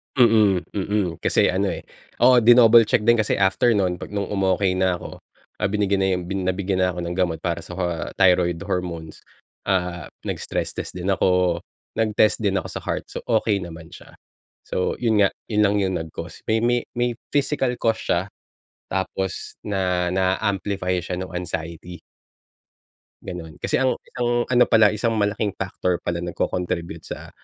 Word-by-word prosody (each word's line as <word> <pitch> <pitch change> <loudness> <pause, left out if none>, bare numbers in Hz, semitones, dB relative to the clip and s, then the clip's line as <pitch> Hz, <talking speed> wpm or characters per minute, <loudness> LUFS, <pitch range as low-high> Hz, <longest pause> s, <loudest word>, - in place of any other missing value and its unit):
Mm, 110 -7 +5
mm, 100 -1 -1 0.2
kasi - - +3
ano 95 0 0
eh, - - -6 0.4
oo 125 +1 +7
dinouble 120 -1 +7
check 105 - +2
din 120 +2 +4
kasi 110 -2 +1
after 100 +5 +3
no'n, 95 -4 +1
pag 95 - -9
nung 100 -2 -2
umokey 95 -1 +1
na 95 0 +2
ako, 90 - -7 0.4
ah, - - -1
binigyan 100 -1 +1
na - - +2
yung 90 -1 -2
bin 95 -1 -2
nabigyan 95 0 0
na 90 - 0
ako 90 - -5
ng 85 +1 -4
gamot 85 -4 0
para 85 -2 -3
sa - - -9 0.4
thyroid 90 -2 +3
hormones. 85 -3 -4 0.4
Ah, 90 -4 -1 0.2
nag-stress - - -3
test - - -4
din 90 +1 -4
ako 90 -2 +2 0.3
nag-test 110 0 +2
din 100 -2 +1
ako - - -8
sa - - -6
heart, - - -2
so - - -6
okey 110 -3 +2
naman 85 -2 -8
siya. - - -14 0.5
So, 90 - -1
yun 110 -4 +2
nga, 100 - +5 0.2
yun 105 -2 +2
lang 100 0 +2
yung 95 -1 0
nag 80 0 -5
cause, - - -8
may 110 - +2
may 120 0 +1
may 120 0 0 0.2
physical 145 -2 +1
cause 115 -1 +1
siya, 85 - +2 0.7
tapos 95 0 -3
na 90 -3 0
na 95 0 +2
amplify 95 -2 -1
siya 90 +1 -4
nung 95 -2 -6
anxiety. 85 0 -5 1.2
'Ganon, 80 -3 -8
kasi - - +1
ang 130 -1 +2
isang 120 -1 -1
ano 125 -1 +5
pala 110 -2 +5
isang 110 +2 -1
malaking 105 -1 0
factor 90 -1 -2
pala 85 0 -3
nagko-contribute 85 0 -3
sa, - - -8
95 Hz, 170 wpm, -23 LUFS, 90-110 Hz, 1.2 s, oo